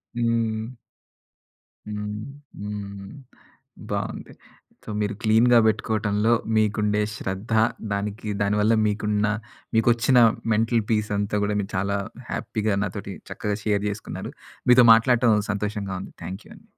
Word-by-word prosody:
హ్మ్. 115 -2 0 1.2
హ్మ్. 105 0 -4 0.4
హ్మ్. 100 -1 -6 0.8
బావుంది. - - -4 0.5
సో - - -8
మీరు 105 0 -1
క్లీన్‌గా 115 +2 +5
పెట్టుకోవటంలో 110 0 +1 0.2
మీకుండే 105 0 +2
శ్రద్ధ, 95 +4 -5 0.4
దానికి 105 +2 -3
దాని 100 +1 +1
వల్ల 110 +2 +4
మీకున్న 105 0 0 0.5
మీకొచ్చిన 120 +3 +4 0.3
మెంటల్ 115 +1 +2
పీస్ 105 -1 +1
అంతా 105 0 -1
కూడా 105 0 -1
మీరు 100 - -5
చాలా 100 +1 0 0.3
హ్యాపీ‌గా 105 -2 -1
నాతోటి 90 - -5 0.2
చక్కగా 105 -1 -2
షేర్ 105 -2 +1
చేసుకున్నారు. 105 - -6 0.4
మీతో 125 0 +8
మాట్లాడటం 115 -1 +4 0.2
సంతోషంగా 100 -2 -3
ఉంది. - - -9
థాంక్ 95 +4 -7
యూ - - -16
అండి. - - -20
105 Hz, 120 wpm, -24 LUFS, 100-110 Hz, 1.2 s, మీతో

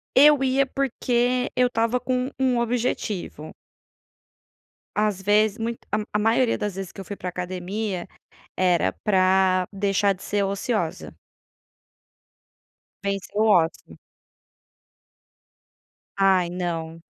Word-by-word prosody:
Eu 290 0 +7
ia 270 +1 +2
porque 250 -2 0
eu 250 0 +4
estava 230 +1 0
com 255 +1 -1
um 255 -2 +2
objetivo. 225 -9 -2 1.4
Às 210 -2 0
vezes 210 +2 +3
muito 230 +1 -3
a 215 - +2 0.2
a 210 - +2
maioria 230 +3 +2
das 210 -3 -3
vezes 195 -2 -6
que - - -13
eu - - -10
fui 205 - -6
para 180 - -5
academia 185 +2 -4 0.5
era 175 - +2
para 185 -2 +3
deixar 200 0 +1
de 185 - -15
ser 205 -1 -1
ociosa. 200 -2 -2 1.9
Vencer 200 0 -3
o 220 - +4
ócio. 175 -6 +1 2.2
Ai, 190 -3 +4
não. 165 -2 -4
205 Hz, 110 wpm, -24 LUFS, 185-235 Hz, 2.2 s, Eu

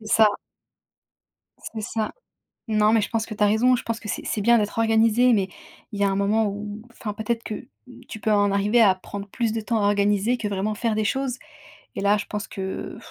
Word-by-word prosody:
C'est 215 - -12
ça. 220 -1 +7 1.5
C'est 220 - -4
ça. 215 +1 -3 0.6
Non, 215 0 +3
mais 225 - +4
je 205 - -3
pense 225 -1 -1
que 225 - -7
tu 210 0 0
as - - +5
raison, 240 +5 +4
je 245 - -4
pense 230 0 -3
que 210 - -9
c'est - - -4
c'est - - -2
bien 235 +3 +5
d'être 210 -1 -1
organisé, 225 +2 +4
mais 195 -3 +1 0.4
il 205 - -6
y - - +2
a - - +3
un 195 - -1
moment 210 +2 +2
où, 205 +1 -6
enfin 215 -3 -6
peut-être 225 +2 -2
que 220 +3 -6 0.4
tu 220 - -8
peux 215 - +1
en 205 -1 +3
arriver 210 +4 +3
à 195 -4 +6
prendre 200 +2 -8
plus 230 +2 -1
de 225 - -2
temps 220 0 -1
à 205 - +3
organiser 205 +3 +2
que 215 -3 -3
vraiment 205 +2 -1
faire 230 0 -1
des 215 - +1
choses 265 +3 -1 0.6
et - - -3
là, 205 +1 +3
je - - -4
pense 210 0 -5
que 190 -1 -5
215 Hz, 235 wpm, -24 LUFS, 205-225 Hz, 1.5 s, ça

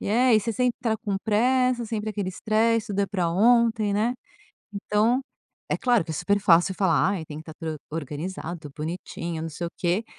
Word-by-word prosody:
E - - -4
é, 240 +2 +4
e 215 - +5
você 230 +2 -2
sempre 250 +2 0
tá 220 -2 +1
com 205 -3 -3
pressa, 250 +2 +2
sempre 215 -1 -3
aquele 205 -3 -3
stress, 220 +3 +1
tudo 200 0 -1
é 200 - +2
pra 180 -5 -1
ontem, 225 +1 +3
né, 225 +4 +1 0.6
então 210 +5 +1 0.5
é - - +1
claro 240 -8 +2
que - - -8
é 160 - -3
super 200 +6 +1
fácil 175 0 +4
falar: 185 -3 +2
"Ai, 190 -5 -3
tem 150 -1 -8
que - - -8
estar 160 -1 -11
tudo 160 -2 -5
organizado, 160 +1 -5
bonitinho, 165 +1 -5
não 165 - -3
sei 170 +3 -4
o - - -6
quê". 180 +5 0
205 Hz, 205 wpm, -25 LUFS, 170-225 Hz, 0.6 s, e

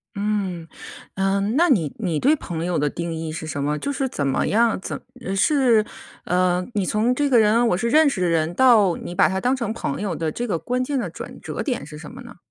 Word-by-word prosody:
嗯。 200 -5 -2 0.5
嗯， 195 +3 0
那 345 +4 +4
你 170 - +2
你 175 -8 -1
对 290 +4 +4
朋 170 - -5
友 175 -1 0
的 145 0 +1
定 170 +2 -4
义 160 -1 -4
是 160 0 -6
什 145 -2 -3
么？ 150 +1 0
就 285 - -2
是 270 -1 -1
怎 145 - -2
么 135 - 0
样， 225 0 +2
怎 - - -5 0.4
是， 235 0 +3 0.4
呃， 180 0 +1
你 200 -3 0
从 220 +6 +1
这 290 +1 +1
个 245 -3 +5
人 225 +3 +4
我 180 - +1
是 235 +4 -1
认 310 +3 +5
识 215 -9 -3
的 180 - +2
人， 165 0 +1
到 215 -6 +5
你 175 - -7
把 - - +5
他 190 - -1
当 250 +2 +2
成 235 -5 -3
朋 140 -10 -4
友 195 -5 -2
的 160 -1 -2
这 240 - -4
个 190 - 0
关 250 +6 -1
键 275 +1 -1
的 235 - -3
转 - - -9
折 - - -5
点 250 - -3
是 150 +1 -10
什 155 - -10
么 260 +2 -11
呢？ 240 -1 -12
200 Hz, 260 characters per minute, -22 LUFS, 170-245 Hz, 0.5 s, 个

